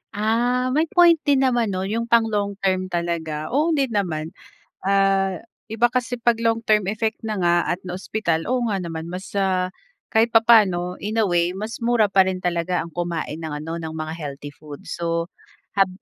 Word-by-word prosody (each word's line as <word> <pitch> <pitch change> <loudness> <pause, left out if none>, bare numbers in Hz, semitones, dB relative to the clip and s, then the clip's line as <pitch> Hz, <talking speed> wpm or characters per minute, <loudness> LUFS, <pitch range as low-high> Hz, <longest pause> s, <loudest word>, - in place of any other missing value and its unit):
Ah, 240 +4 +1
may 310 +4 +2
point 345 -1 +5
din 275 -2 +4
naman 240 -3 +2
'no 185 0 -2
yung 230 +4 -2
pang 235 -1 +5
long 205 -2 -1
term 185 -1 +1
talaga, 165 -3 -3
oo 310 +5 +2
din 270 -4 0
naman. 165 -7 -2 0.5
Ah, 195 -1 +2 0.3
iba 235 +2 +3
kasi 245 0 -2
pag 235 -1 +3
long 230 0 +1
term 215 -3 +3
effect 220 +1 -2
na 215 -3 -2
nga 175 -1 +3 0.2
at 180 - -4
na-ospital, 180 -2 -2
oo 245 -1 0
nga 205 - 0
naman 165 -1 -5
mas 180 +2 -7
ah, 185 -2 0 0.4
kahit 225 +1 +4
papaano, 200 -6 +4
in 210 +3 -4
a - - +3
way, 175 -1 +1
mas 215 +4 -5
mura 230 -3 +2
pa 190 -1 +5
rin 185 -1 -3
talaga 175 0 0
ang 170 - -9
kumain 170 -2 -3
ng 160 -2 -5
ano, 165 +1 -4
ng 160 -1 -6
mga 155 0 -4
healthy 145 -2 -7
food, 145 -1 -11
so 170 0 -3 0.5
hab 195 -1 +5
195 Hz, 185 wpm, -22 LUFS, 170-230 Hz, 0.5 s, point